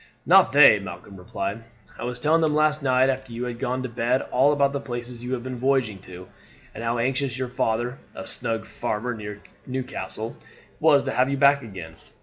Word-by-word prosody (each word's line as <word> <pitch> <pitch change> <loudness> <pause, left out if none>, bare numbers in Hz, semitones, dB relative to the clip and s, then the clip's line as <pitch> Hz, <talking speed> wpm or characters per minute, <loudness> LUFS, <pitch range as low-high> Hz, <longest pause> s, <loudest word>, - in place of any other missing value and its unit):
"Not - - +6
they," 140 -6 +8
Malcolm 100 0 -9
replied. 100 +2 -5 0.4
"I - - -4
was 125 0 -4
telling 160 +5 +3
them 155 -2 +2
last 155 0 +2
night 130 -1 +3
after 130 -1 -2
you 120 +2 -4
had 120 -1 -5
gone 130 0 -2
to 130 - -4
bed 120 +2 0
all 135 +3 +4
about 140 -1 +2
the 140 - -1
places 120 -2 -7
you 125 +1 -3
have 120 -2 -3
been 130 -1 -5
voyaging 130 -6 +1
to, 90 -1 -11 0.5
and 110 - -7
how 115 +1 0
anxious 130 +1 -1
your 130 -1 -3
father, 125 0 -1 0.2
a 115 - -7
snug 115 -1 -2
farmer 110 +4 -3
near 105 -2 -8 0.2
Newcastle, 130 -3 -5 0.4
was 150 -3 +5
to - - -2
have 130 +1 +2
you 140 - -1
back 140 0 +5
again. 90 -8 -9
125 Hz, 200 wpm, -24 LUFS, 115-135 Hz, 0.5 s, they